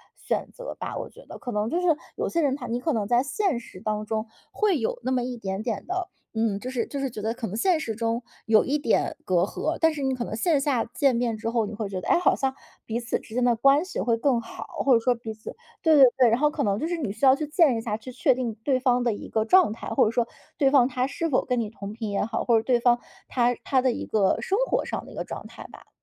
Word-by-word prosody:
选 - - -3
择 - - -7
吧， - - -4
我 - - -5
觉 - - -16
得， - - -9
可 245 - -6
能 210 0 -1
就 345 +6 0
是 360 - 0 0.3
有 - - -2
些 335 - 0
人 280 -3 +2
他 255 -3 -7
你 235 +1 -2
可 315 +5 -1
能 215 -4 0
在 240 +2 +3
现 290 - 0
实 210 -6 -13
当 215 -1 -2
中 220 +1 -2 0.2
会 415 -5 +2
有 225 - -1
那 255 - -1
么 250 -1 +1
一 250 0 -4
点 195 -2 -4
点 225 -2 -3
的， 370 0 -2 0.3
嗯， 220 -3 0
就 255 - -5
是 245 -3 -1
就 280 - -5
是 270 - -1
觉 215 - -6
得 220 +2 -1
可 240 -1 -5
能 195 - -6
现 355 +8 +3
实 225 - -3
中 230 +2 -1 0.2
有 220 -1 +5
一 285 +3 0
点 290 - +1
隔 180 -2 +2
阂。 310 - -2
但 325 -1 +4
是 295 - -5
你 265 0 +1
可 245 - -3
能 220 - -6
线 295 +6 +2
下 270 -5 +1
见 265 +3 +1
面 235 -2 0
之 225 - -3
后， 230 -1 +1
你 210 - -6
会 210 -1 -4
觉 190 -2 -3
得， - - -7
诶， - - +4
好 355 - +3
像 265 -1 -1 0.3
彼 230 +1 -2
此 240 0 -2
之 220 - -14
间 250 - +1
的 245 -1 +4
关 275 +6 +4
系 370 0 -5
会 235 - +2
更 245 0 +2
好。 230 - -8 0.2
或 270 - +5
者 235 - +5
说 250 +2 +3
彼 230 -2 -7
此 215 0 -9 0.3
对 320 -2 +5
对 275 - +10
对， 250 -3 +6
然 230 +2 +2
后 300 +1 +4
可 - - -2
能 200 0 +1
就 320 - -1
是 345 - -1
你 270 -11 -2
需 220 +7 -1
要 260 0 +7
去 305 - -3
见 300 -4 +4
一 - - -3
下， 215 -2 -2
去 240 +4 -9
确 250 - +3
定 240 -3 -3
对 265 -1 +2
方 250 -1 +2
的 235 -2 +1
一 - - -8
个 220 - +1
状 365 - +5
态， - - -8
或 270 - +3
者 215 - +1
说 235 0 +1 0.3
对 275 -4 +4
方 260 -3 +5
他 250 -1 -1
是 330 +4 -2
否 260 - +2
跟 250 -2 0
你 220 -2 -2
同 205 -2 -8
频 220 -1 -4
也 200 - 0
好， 220 +2 -2
或 235 -2 +4
者 220 - 0
对 245 0 +2
方 240 0 +3 0.3
他 245 -1 +2
他 265 -2 +2
的 255 0 +2
一 - - -4
个 205 -3 +2
生 390 - 0
活 - - 0
上 - - -4
的 - - -12
一 - - -12
个 - - -3
状 - - -7
态 - - -11
吧。 - - -15
245 Hz, 320 characters per minute, -25 LUFS, 225-275 Hz, 0.3 s, 对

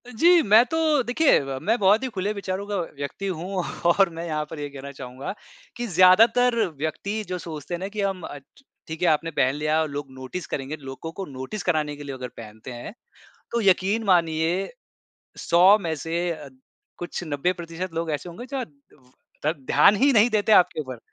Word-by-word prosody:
जी, 340 +9 +5
मैं 215 0 +6
तो 320 +6 -3 0.3
देखिए 250 +6 +3 0.2
मैं 225 +4 +1
बहुत 205 +5 +4
ही - - -1
खुले 200 -2 -2
विचारों 195 -1 -4
का 205 - -3 0.2
व्यक्ति 145 +8 -5
हूँ 185 +1 -3 0.2
और 175 +2 +4
मैं 165 +1 -6
यहाँ 155 -2 -2
पर 160 - -7
ये 145 0 -4
कहना 140 0 -9
चाहूँगा 130 +1 -7 0.4
कि 240 0 -3
ज्यादातर 225 +7 +5 0.2
व्यक्ति 200 +8 -3
जो 180 - -2
सोचते 160 -2 -7
हैं 175 - -2
ना, 190 - -4
कि 205 +1 -4
हम 195 -2 -2 0.6
ठीक 160 0 -7
है 180 - +3
आपने 165 +2 +1
पहन 135 -2 +1
लिया 155 +1 +1
और 155 - -2
लोग 145 0 -5
नोटिस 130 +7 -6
करेंगे, 135 +2 -4
लोगों 135 +2 -8
को 195 +3 -6
नोटिस 135 +9 -6
कराने 155 -4 0
के 145 - -10
लिए 140 -1 -6
वो - - -7
अगर 125 - -4
पहनते 110 +2 -10
हैं, 120 +10 -8 0.6
तो 235 - +1
यकीन 200 +2 +2
मानिए 170 0 +1 0.7
100 180 +4 +5
में 165 -5 -2
से 165 +4 -2
अ, 155 -4 -6 0.5
कुछ 175 - -5
90% 170 +3 -3
लोग 165 0 -2
ऐसे 150 +4 -3
होंगे 215 +9 -9
जो 260 - -2 0.8
द 155 - +2
ध्यान 205 - +5
ही 275 +6 +4
नहीं 225 -1 +5
देते 215 0 +2
आपके 180 -5 +5
ऊपर। 130 -4 -7
175 Hz, 190 wpm, -24 LUFS, 150-200 Hz, 0.8 s, मैं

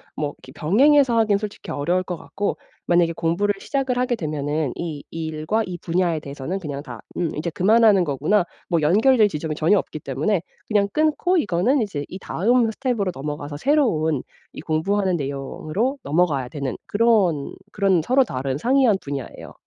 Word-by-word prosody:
뭐 145 -1 -3
이렇게 130 - -15
병행해서 240 - +4
하기엔 215 -3 +3
솔직히 210 -1 -7
어려울 175 +6 0
것 180 -1 -4
같고 200 +4 -3 0.3
만약에 175 -1 +3
공부를 170 +5 0
시작을 265 +1 -1
하게 250 0 +1
되면은 150 - -2
이 155 -4 -5
일과 160 +6 -2
이 180 -2 -6
분야에 170 -1 0
대해서는 145 +6 -5
그냥 145 -5 -5
다 - - -9 0.2
'음 170 -3 -1
이제 155 +3 -2
그만하는 205 +2 +4
거구나.' 155 +7 +1 0.3
뭐 170 -3 +2
연결될 215 - +4
지점이 155 -2 -4
전혀 165 +6 +3
없기 155 - -6
때문에 150 +8 -1 0.3
그냥 205 -2 +2
끊고 310 +4 +2
이거는 230 - +2
이제 150 -9 -3
이 185 - -7
다음 230 +6 +1
스텝으로 220 -5 -1
넘어가서 145 +1 -5
새로운 160 - +2 0.3
이 - - -10
공부하는 185 +5 0
내용으로 155 - -3
넘어가야 145 -5 +1
되는 140 -2 -4
그런 205 -10 +2 0.2
그런 195 -5 +2
서로 255 - +4
다른 135 - -3
상이한 250 - +3
분야예요. 140 -2 -7
175 Hz, 380 characters per minute, -22 LUFS, 150-220 Hz, 0.3 s, 병행해서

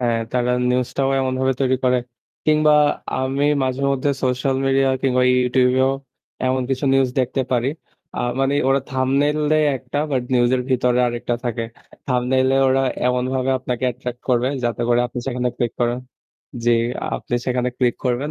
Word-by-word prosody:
হ্যাঁ, 120 -2 +1
তারা 125 0 +1 0.2
নিউজটাও 125 +2 0
এমনভাবে 130 0 0
তৈরি 130 -1 +2
করে। 125 0 +3 0.5
কিংবা 155 0 +4 0.5
আমি 135 +2 0 0.2
মাঝেমধ্যে 135 +1 0
সোশ্যাল 130 +1 0
মিডিয়া 135 0 +3
কিংবা 125 -1 +2 0.2
Youtube 125 0 +2
এও 135 +1 +3 0.5
এমন 130 0 +1
কিছু 130 +1 -1
নিউজ 135 -1 +3
দেখতে 130 +1 -1
পারি। 125 +1 +1 0.5
আ - - 0 0.2
মানে 135 +1 +1
ওরা 135 +1 +3
thumbnail 135 +3 +1 0.2
দেয় 155 -1 +3
একটা 130 +3 -5
বাট 130 -3 0
নিউজ 120 -1 +3
এর 125 - -2
ভিতরে 125 -1 +2
আরেকটা 120 0 -2
থাকে। 115 -1 -2 0.4
thumbnail 130 +1 +1
এ - - +3
ওরা 135 +1 +2 0.3
এমনভাবে 130 +1 0
আপনাকে 125 0 -3
অ্যাট্রাক্ট 125 0 -6
করবে 125 0 +2 0.2
যাতে 120 0 -1
করে 120 0 +3
আপনি 125 - -7
সেখানে 125 -1 -1
ক্লিক 120 -2 -1
করেন 120 0 +1 0.7
জি, 120 - +3 0.5
আপনি - - -5
সেখানে 125 -1 0
ক্লিক 125 -2 +2
করবেন 130 +4 -1
130 Hz, 160 wpm, -21 LUFS, 125-135 Hz, 0.7 s, কিংবা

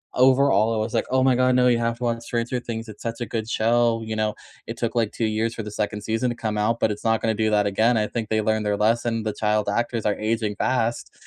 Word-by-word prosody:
overall, 130 -4 +4
I - - -1
was 110 +1 -2
like, - - +1
"Oh 130 0 +3
my 130 -1 +4
god, 130 0 +3
no, 125 0 +4
you 120 - +4
have 115 0 -1
to 125 - -7
watch 115 -1 -1
Stranger 120 +1 -2
Things, 115 -1 -5
it's 105 - -11
such 115 0 -4
a - - -1
good 110 -2 -3
show." 115 0 +2
You 110 0 -4
know, 110 -1 0 0.3
"It - - -6
took 115 0 -2
like 115 -3 +1
2 115 - -2
years 110 +1 -1
for 115 - -5
the 105 - -6
2nd 105 0 -3
season 115 +3 -1
to 120 - -3
come 110 -2 -3
out, 115 +3 +1
but - - +2
it's 105 - -6
not 110 -1 +1
gonna 110 - +1
do 110 +1 +1
that 105 -1 +3
again, 110 +4 +2
I 105 -1 +1
think 115 -2 -4
they 110 0 +1
learned 110 0 0
their 105 0 0
lesson, 115 +1 +1
the 110 -1 -2
child 105 -1 0
actors 115 +1 -1
are 105 - +2
aging 110 -1 -1
fast." 120 0 -1
115 Hz, 275 wpm, -23 LUFS, 110-120 Hz, 0.3 s, overall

